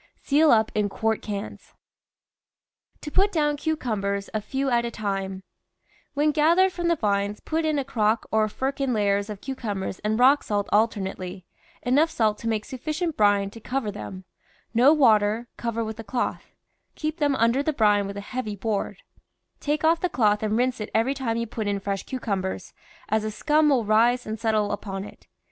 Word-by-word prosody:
Seal 300 +2 +4
up 220 -3 +4
in 210 -1 +1
quart 220 +2 -1
cans. 205 -1 -6 1.3
TO 295 - -7
PUT 395 +5 +3
DOWN 295 -4 +1
CUCUMBERS 215 -11 -2
A 215 - -1
FEW 270 +4 -2
AT 235 -1 +3
A 235 - -2
TIME 195 -3 -3 0.7
When 300 +2 +3
gathered 335 +6 +4
from 345 -1 -2
the 340 - +3
vines 205 -4 -1
put 320 0 -2
in 310 -1 +1
a 275 - -1
crock 220 -3 +1
or 215 0 +2
firkin 265 +1 -1
layers 200 0 +1
of 210 -2 -7
cucumbers 210 -9 -4
and 215 +1 -1
rock 270 +4 +6
salt 205 -1 -1
alternate 205 -3 +1
ly, 185 0 -7 0.4
enough 285 +6 +3
salt 215 -7 0
to 230 - -5
make 220 -2 -1
sufficient 310 +5 -3
brine 205 -1 +3
to 230 - -11
cover 250 -1 -2
them; 190 -2 -8 0.5
no 245 +5 +6
water; 225 -5 +3
cover 230 -1 -2
with 220 0 -6
a - - -5
cloth; 240 +4 -3 0.5
keep 310 +1 -3
them 290 -4 +2
under 235 +3 +2
the 310 - 0
brine 210 -6 +3
with 200 0 -6
a - - -4
heavy 215 0 -4
board; 215 - -3 0.6
take 300 +1 -1
off 325 +1 +4
the 360 - 0
cloth 210 -7 +2
and 215 0 0
rinse 250 -1 0
it 210 - -4
every 230 +5 +2
time 240 -5 -2
you 230 - -1
put 220 -1 -4
in 200 -1 0
fresh 195 0 -3
cucumbers, 200 -7 -3 0.4
as 220 0 +1
a 215 - -2
scum 300 +8 +2
will 255 -6 +2
rise 235 +4 +3
and 215 0 -5
settle 215 -2 +1
upon 195 -2 -4
it. - - -14
225 Hz, 190 wpm, -25 LUFS, 205-275 Hz, 1.3 s, rock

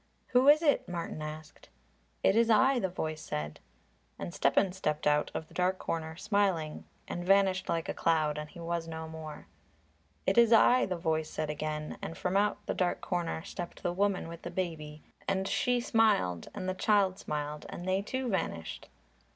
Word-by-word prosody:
"Who 255 +2 +5
is 305 +3 +6
it?" 290 - +2
Martin 170 -3 -4
asked. 155 0 -8 0.5
"It - - +4
is 230 0 +4
I," 260 +3 +5
the 190 - 0
voice 155 -3 -4
said. 75 0 -4 0.6
And 85 0 -6
Stepan 180 +7 +3
stepped 150 -5 -2
out 150 0 +3
of 160 - -4
the - - -19
dark 185 +1 +1
corner, 160 -2 -3
smiling, 185 -5 0 0.2
and 175 - -4
vanished 190 0 +3
like 165 -2 0
a - - -2
cloud, 155 -2 +1
and 150 0 -6
he 170 - -12
was 170 0 -3
no 160 0 -5
more. 160 -1 -8 0.8
"It - - +4
is 235 -1 +6
I," 245 +3 +6
the 185 -2 -2
voice 160 -2 -1
said 155 -1 -2
again, 150 0 -4
and 165 - -6
from 180 +1 -1
out 205 +1 +1
the - - -1
dark 180 -1 0
corner 170 -2 -2
stepped 175 0 -7
the 175 - 0
woman 195 -1 0
with 170 0 -9
the - - -5
baby, 160 -4 -4 0.2
and 195 0 0
she 245 +3 +1
smiled 215 - +2
and 185 - -4
the 185 - 0
child 195 -1 +2
smiled, 150 0 -4
and 175 - -7
they 190 +1 +2
too 260 +5 -3
vanished. 85 - -3
175 Hz, 185 wpm, -31 LUFS, 155-195 Hz, 0.8 s, is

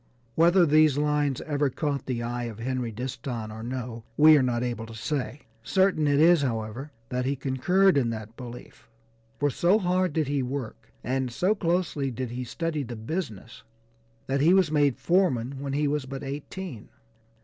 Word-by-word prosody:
Whether 170 +4 +5
these 155 -2 +4
lines 150 -2 +1
ever 145 -2 0
caught 140 0 -3
the 120 -3 -2
eye 120 +1 -3
of 115 -3 -6
Henry 125 0 -2
Disston 120 -1 -5
or 110 +1 -8
no, 120 -1 -5
we 155 +1 +8
are 145 - +4
not 125 -2 0
able 120 -2 -3
to 115 - -10
say; 135 +3 -3 0.2
certain 190 - +2
it 145 0 +3
is, 165 0 +6
however, 120 +2 -3 0.2
that 125 0 -2
he 140 +2 0
concurred 145 +8 +2
in 120 -3 0
that 110 0 -6
belief, 125 -1 -11 0.5
for 145 0 +1
so 175 +9 +3
hard 185 -3 +1
did 155 -2 0
he 140 -1 0
work, 130 -2 -5
and 130 0 -1
so 185 - +2
closely 170 -7 -1
did 125 -1 -5
he 125 +1 -4
study 160 +5 -3
the 120 -3 -6
business, 115 - -5 0.6
that 135 +1 0
he 170 +5 +5
was 185 -5 +3
made 145 -4 +2
foreman 140 -8 +1
when 140 0 -4
he 145 +1 +1
was 145 -2 -1
but 135 +1 -6
eighteen. 140 - -7
135 Hz, 180 wpm, -26 LUFS, 120-155 Hz, 0.6 s, we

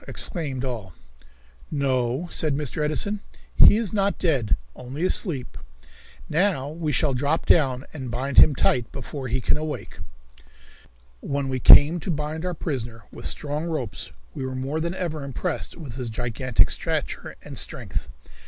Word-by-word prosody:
exclaimed 140 -7 -1
all. 110 -8 -5 0.8
"No," 130 +1 0
said 155 -3 +1
Mr. 150 +1 -1
Edison, 200 +8 0 0.4
"he 210 - +8
is 225 -4 -2
not 200 -1 +1
dead, 135 - +2 0.2
only 135 +7 -4
asleep. 155 - 0 0.7
Now 165 -5 +1
we 155 0 -2
shall 145 -1 +2
drop 145 +5 0
down 135 -5 +3
and 130 -5 -5
bind 130 +3 +2
him 145 - +7
tight 125 -2 +1
before 135 -3 -6
he 125 +2 0
can 125 - +1
awake." 155 0 -5 1.2
When 140 - -2
we 130 -1 -1
came 150 +7 +8
to 165 - -6
bind 155 +1 -2
our 180 -1 -2
prisoner 120 - -4
with - - -5
strong 150 +2 -3
ropes 155 -10 -3 0.2
we - - -5
were 130 0 -3
more 135 +4 -2
than 170 +3 -2
ever 160 -5 -3
impressed 140 +6 -3
with 140 -8 -8
his 125 -3 -3
gigantic 120 +2 +1
stature - - -3
and - - -8
strength. 65 - -5
140 Hz, 155 wpm, -25 LUFS, 130-160 Hz, 1.2 s, he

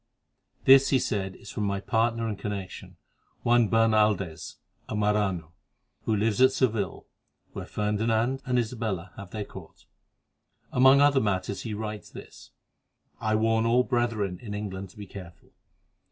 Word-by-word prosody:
"This," 135 0 +7
he 135 - +4
said, 95 -6 -2
"is - - -11
from 105 - -2
my 100 -1 -1
partner 115 +2 0
and 105 - -2
connection, 100 -3 -6 0.5
Juan 120 -2 +4
Bernaldez, 105 -7 +1 0.3
a - - -3
Marano, 105 -6 0 0.5
who 110 - +1
lives 110 +2 +1
at 130 0 +7
Seville, 115 -6 -1 0.5
where - - -6
Ferdinand 110 +5 0
and 125 -1 0
Isabella 110 -7 -3
have 100 -2 -9
their 105 +1 -5
court. - - -13 0.9
Among 130 +2 +6
other 145 -2 +5
matters 100 -1 -1
he 110 -3 -4
writes 105 0 -6
this: - - -12 0.7
'I 110 -1 0
warn 110 +1 +2
all 125 +2 +4
brethren 115 -8 -1
in 105 -3 -6
England 95 -2 -5
to 95 - -19
be 105 - -7
careful. 90 -3 -12
110 Hz, 145 wpm, -27 LUFS, 100-115 Hz, 0.9 s, This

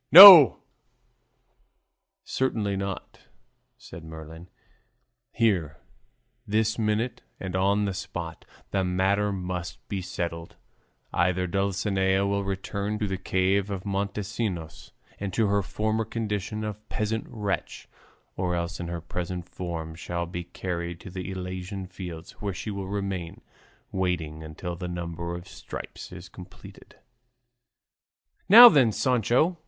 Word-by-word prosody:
"No, 175 - +13 1.7
certainly 110 -6 -1
not," 95 0 -6 0.5
said 80 - -11
Merlin; 80 +2 -10 0.8
"here, 90 -11 +1 0.7
this 110 +1 +1
minute, 110 +3 -1 0.2
and 95 -1 -5
on 100 +2 +2
the 100 - -2
spot, 85 -4 -6 0.3
the 95 -1 +1
matter 95 +3 +1
must 90 -2 -5
be 100 -2 -2
settled; 85 -2 -5 0.6
either 90 +1 +1
Dulcinea 95 0 0
will 100 0 0
return 100 +2 -3
to 105 - -1
the 95 -2 -3
cave 95 +2 +1
of 95 -1 -5
Montesinos 100 -6 -3 0.3
and 100 -1 -3
to 115 - +3
her 100 0 +2
former 110 +3 -1
condition 105 -1 -3
of 105 0 -7
peasant 110 +1 -3
wench, 105 -4 -3 0.5
or 90 -1 -1
else 85 0 -3
in 85 - -4
her 85 0 -5
present 90 +1 -5
form 85 -3 -5
shall 85 +1 -4
be 85 0 -6
carried 85 -1 -5
to 90 - -10
the 90 0 -6
Elysian 95 +1 -5
fields, 90 -3 -8
where 100 -3 -3
she 105 +5 -5
will 100 -1 -5
remain 95 -4 -4 0.5
waiting 85 -4 -2
until 80 +3 -6
the 90 +1 -6
number 85 0 -5
of 90 +2 -9
stripes 95 - -9
is 90 0 -10
completed." 90 0 -14 1.5
"Now 235 +5 +12
then, 135 - +5
Sancho!" 130 - +1
95 Hz, 125 wpm, -26 LUFS, 85-105 Hz, 1.7 s, No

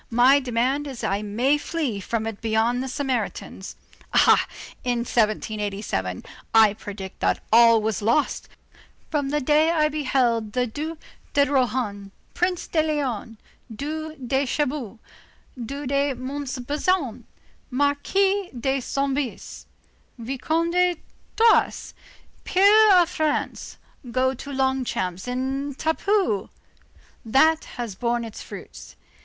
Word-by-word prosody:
My 250 +4 +5
demand 260 +3 0
is 265 -4 -7
that - - -1
I 200 +1 0
may 240 +8 +1
flee 290 -11 -2
from 220 +3 -2
it 225 -2 -5
beyond 225 +2 +1
the 265 - -3
Sarmatians. 250 -7 -3 0.4
Ah! - - +5 0.4
in 245 -1 0
1787, 210 - -1 0.3
I 220 -2 +7
predict 200 -2 -8
that - - 0
all 230 -1 +7
was 220 -1 -1
lost, 235 +8 0 0.6
from 285 -3 0
the 295 +1 +1
day 300 +3 +3
when 335 0 +1
I 305 0 +3
beheld 255 -7 0
the 250 0 +1
Duc 305 +7 -5 0.4
de 285 0 +4
Rohan, 245 -7 -1 0.2
Prince 360 0 0
de 320 - +1
Léon, 265 -8 -2 0.3
Duc 310 +6 -5
de 265 +3 +1
Chabot, 260 -5 -2 0.6
Duc 270 +3 -5
de 280 0 +1
Montbazon, 280 - -2 0.4
Marquis 360 +9 +1
de 270 +2 0
Soubise, 275 0 -3 0.5
Vicomte 275 +8 -1
de 360 0 +3 0.4
Thouars, 455 0 +3 0.5
peer 410 +3 +6
of 345 - +4
France, 310 -4 -2 0.3
go 260 +2 +1
to 280 +2 -8
Longchamps 260 -9 -1
in 265 +3 -2
a - - -29
tapecu! 320 - 0 0.7
That 310 +8 +3
has 235 -4 -4
borne 235 +4 -1
its 225 - -9
fruits. - - -10
265 Hz, 125 wpm, -24 LUFS, 230-295 Hz, 0.7 s, I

